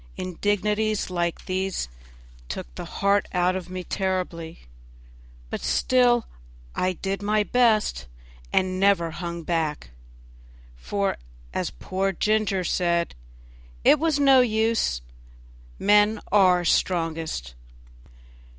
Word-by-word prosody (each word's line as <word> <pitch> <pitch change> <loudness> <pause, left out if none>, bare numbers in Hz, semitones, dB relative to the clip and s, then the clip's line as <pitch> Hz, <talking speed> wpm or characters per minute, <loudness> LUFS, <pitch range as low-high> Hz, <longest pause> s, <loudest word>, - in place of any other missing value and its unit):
Indignities 205 +3 -1
like 175 -1 -2
these 190 - -2 0.6
took - - -6
the - - -7
heart 200 +1 +1
out 180 0 +2
of 185 -1 -5
me 185 0 -5
terribly, 180 -4 -3 0.9
but - - -4
still 245 -2 +3 0.5
I 185 0 0
did 195 +2 -4
my 210 +1 +2
best 215 - +2 0.4
and 185 0 +1
never 190 -4 +3
hung 170 0 -5
back; 155 - -2 0.8
for, 200 - -2 0.4
as - - -1
poor 190 - -2
Ginger 210 -1 +1
said, 170 -1 0 0.7
it 300 - +6
was 320 -2 +1
no 270 -2 +6
use; 220 - +1 0.8
men 210 +1 +4
are 185 -3 +5
the - - -6
strongest. 165 - 0
190 Hz, 105 wpm, -25 LUFS, 170-210 Hz, 0.9 s, it